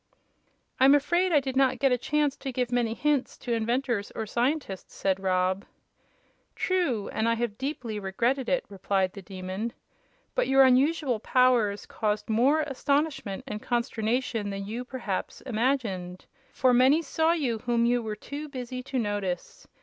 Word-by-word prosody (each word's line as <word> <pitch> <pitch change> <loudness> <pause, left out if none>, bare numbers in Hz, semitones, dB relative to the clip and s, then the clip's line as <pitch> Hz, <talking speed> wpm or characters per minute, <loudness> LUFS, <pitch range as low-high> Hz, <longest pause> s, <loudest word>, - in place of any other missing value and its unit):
"I'm 270 +2 +7
afraid 345 +6 +2
I 300 - +6
did 265 -1 -4
not 260 -1 +3
get 270 +1 +2
a - - +5
chance 295 +2 +1
to 270 - -5
give 250 -1 -2
many 235 -2 +1
hints 290 -2 0
to 240 - -3
inventors 235 -1 -1
or 220 - -3
scientists," 240 - -2
said 195 -1 0
Rob. 185 0 +1 0.9
"True, 340 - 0
and 220 +1 0
I 230 - +2
have 230 -2 -2
deeply 250 -6 -3
regretted 235 +7 0
it," 265 - +1
replied 195 -1 -1
the 200 - -8
Demon. 190 +4 -5 0.6
"But - - +1
your 270 0 +6
unusual 265 -1 +3
powers 240 -4 +2
caused 210 0 -2
more 265 +8 +4
astonishment 280 -6 -1
and 215 -5 -5
consternation 235 -2 -1
than 195 0 -4
you, 230 +5 -4
perhaps, 245 -7 -4
imagined; 220 -8 -2 0.3
for 255 -1 +3
many 265 +6 +5
saw 320 +2 +2
you 255 -9 -1
whom 235 0 +1
you 240 0 +2
were 215 -2 -4
too 290 +7 -7
busy 255 -2 -5
to 265 +1 -4
notice. 205 -6 -3
245 Hz, 155 wpm, -27 LUFS, 210-270 Hz, 0.9 s, I'm